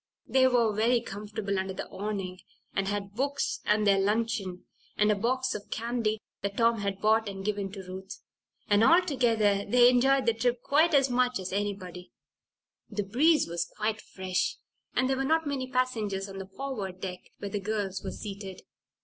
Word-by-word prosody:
They 260 -1 +4
were 235 -4 +3
very 230 +4 +3
comfortable 205 -2 -4
under 190 0 -3
the - - -5
awning, 195 -3 -4 0.3
and 195 0 0
had 200 0 -3
books, 275 +5 -1
and 210 0 +2
their 200 -1 +5
luncheon, 200 -3 -1 0.3
and 210 0 +4
a - - +3
box 255 +5 0
of 205 -1 -7
candy 230 -2 -1 0.2
that 200 0 -3
Tom 230 -1 +3
had 200 -1 -2
bought 220 0 +3
and 195 -1 -7
given 205 -2 -1
to 195 -2 -7
Ruth, 190 +1 -8 0.5
and 205 +1 +4
altogether 235 - +3
they 245 +4 +6
enjoyed 265 +2 +3
the 230 - +4
trip 240 +2 0
quite 310 +3 +4
as 270 -2 +4
much 250 0 +2
as 185 -1 -5
anybody. 190 -3 -4 0.8
The 210 -1 -2
breeze 285 +10 +3
was 170 0 -2
quite 215 0 -1
fresh 185 -1 -2 0.4
and 255 - +3
there 265 0 +1
were 270 - 0
not 320 +3 +2
many 275 -3 -2
passengers 220 -7 -1
on 195 0 -8
the 190 - -6
forward 195 -5 -5
deck 185 -1 -5 0.2
where 200 - -6
the 205 - -1
girls 200 -1 -2
were - - -3
seated. 195 -2 -7
210 Hz, 180 wpm, -29 LUFS, 195-245 Hz, 0.8 s, they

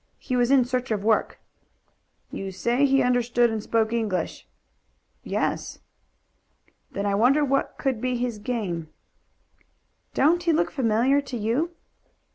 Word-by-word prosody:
He 255 - -4
was 245 -1 +2
in 265 -3 +5
search 255 +1 -2
of 210 -3 -1
work." 220 0 +1 0.9
"You 195 0 -5
say 240 +9 +1
he 270 0 +3
understood 245 -1 +2
and 220 -1 -2
spoke 220 +1 0
English?" 220 -6 -2 0.8
"Yes." - - -2 1.1
"Then 200 - -3
I 200 - +1
wonder 260 +8 +4
what 275 0 -1
could 260 -5 -1
be 255 0 0
his 240 -3 -3
game." 200 -9 -3 1.3
"Don't 330 +5 +3
he 340 -1 +2
look 335 +2 +1
familiar 260 +1 +2
to 265 -3 -6
you?" 255 +11 -1
245 Hz, 135 wpm, -25 LUFS, 220-270 Hz, 1.3 s, in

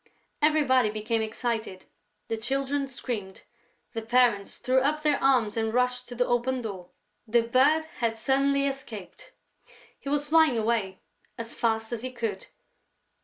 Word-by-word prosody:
Everybody 280 -6 +4
became 215 +2 -1
excited, 220 -3 -3 0.4
the 225 - -1
Children 275 +4 -1
screamed, 225 -7 -6 0.5
the 225 - -3
parents 235 -3 +2
threw 255 +1 +2
up 300 +3 0
their 295 -2 +2
arms 250 -6 +3
and 225 -1 0
rushed 250 +1 0
to 245 - -7
the 245 +1 +2
open 245 +2 0
door: 190 -6 -7 0.4
the 235 +1 +3
Bird 275 +7 +3
had 230 -2 0
suddenly 275 +4 +2
escaped! 260 -8 -6 0.7
He 275 - -6
was 290 0 0
flying 315 -5 +5
away 215 -4 -1 0.4
as 230 0 -6
fast 225 0 -1
as 230 - -3
he 255 +1 -5
could. 225 -6 -4
240 Hz, 145 wpm, -27 LUFS, 220-270 Hz, 0.7 s, flying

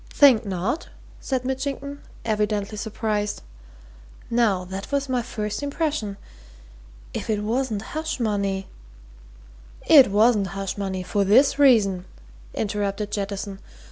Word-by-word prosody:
"Think 255 -7 +5
not?" 195 - -2 0.3
said 260 -2 -2
Mitchington, 275 +2 -3 0.2
evidently 210 -1 0
surprised. 210 -1 -2 0.9
"Now, 215 -6 +2
that 190 +5 -7
was 280 0 0
my 255 -2 0
first 210 -1 -4
impression. 285 -8 -2 1.0
If - - -5
it 210 -1 0
wasn't 225 -1 -1
hush 315 -2 -3
money 200 -4 -1 0.6
" - - -22
"It 265 - +7
wasn't 210 0 +4
hush 195 -1 -3
money, 190 -2 -3
for 200 +2 0
this 255 +9 +4
reason," 205 -10 +4 0.5
interrupted 205 0 -2
Jettison. 200 -1 -4
210 Hz, 115 wpm, -24 LUFS, 195-255 Hz, 1.0 s, It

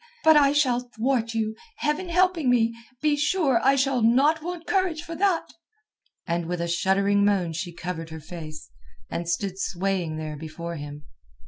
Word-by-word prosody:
But 315 0 +7
I 285 -2 +6
shall 270 -4 +2
thwart 240 -1 -1
you, 220 -1 -1 0.2
Heaven 300 +5 -1
helping 355 -5 +2
me. 230 -2 +3 0.3
Be 300 -1 +3
sure 290 -4 +2
I 275 - +5
shall 270 -2 +1
not 275 +8 +4
want 345 0 -5
courage 365 -5 0
for 335 -1 -7
that." 370 0 0 0.7
And 170 -1 -2
with 175 0 -2
a 170 - -1
shuddering 195 +4 +2
moan 190 -5 +2
she 165 +2 -4
covered 165 -1 -5
her 160 0 -7
face, 155 - -9 0.4
and 170 0 -3
stood 190 +2 -2
swaying 185 -4 -1
there 155 -1 -5
before 165 +2 -6
him. 145 0 -8
220 Hz, 165 wpm, -25 LUFS, -, 0.7 s, But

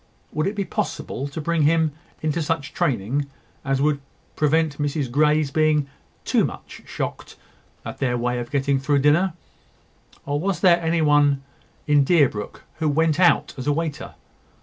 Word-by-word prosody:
Would 155 +3 -1
it 205 - -2
be 200 -1 -2
possible 185 - -3
to 140 +3 -7
bring 165 +1 0
him 160 +1 +3 0.3
into 155 +2 0
such 155 -1 -2
training 140 - -1 0.4
as 135 0 0
would 145 -1 +1 0.3
prevent 155 -1 +1
Mrs 145 -3 -2
Grey's 150 +1 +2
being 155 -1 +2 0.4
too - - +2
much - - -6
shocked - - -5 0.5
at - - -7
their 125 -3 0
way 125 +1 -1
of 120 0 -6
getting 140 -1 +1
through 145 +1 +1
dinner? 165 +5 +3 0.9
Or 145 +1 -1
was 190 +3 -2
there 175 -2 +5
any 165 0 +1
one 145 -2 +3 0.4
in 145 -2 +4
Deerbrook 135 - +1 0.2
who 155 -2 +1
went 160 +2 +1
out 180 - +3
as 130 - -5
a - - +4
waiter? 160 -1 -4
150 Hz, 160 wpm, -23 LUFS, 140-160 Hz, 0.9 s, there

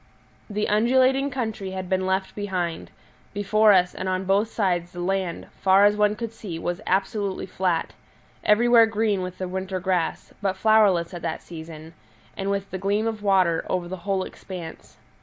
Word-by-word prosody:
The 210 0 -1
undulating 260 +5 +3
country 220 -7 -4
had 185 -1 -5
been 185 0 0
left 190 0 -1
behind; 185 -5 -3 0.5
before 215 +1 +4
us 180 -2 +4
and 185 - -4
on 185 0 -1
both 200 +3 +2
sides 180 -4 -1
the 175 - -8
land, 185 -1 -2 0.2
far 195 +1 +5
as 205 0 +4
one 210 0 +2
could 230 0 -5
see, 195 -7 -7
was 175 +3 -3
absolutely 195 +1 -1
flat, 180 -3 -1 0.5
everywhere 230 +1 +5
green 215 -3 0
with 180 0 -6
the 185 - -4
winter 190 +1 -3
grass, 180 -2 -2
but 190 -2 -1
flowerless 195 -5 +3
at 175 - -6
that 165 -1 -4
season, 160 -1 -10 0.4
and 195 0 -3
with 200 0 -2
the 190 - -4
gleam 200 +3 0
of 220 -2 -3
water, 185 -5 +2
over 180 -2 -1
the 185 +2 -5
whole 190 +1 -1
expanse. 175 -5 -9
190 Hz, 175 wpm, -24 LUFS, 180-210 Hz, 0.5 s, far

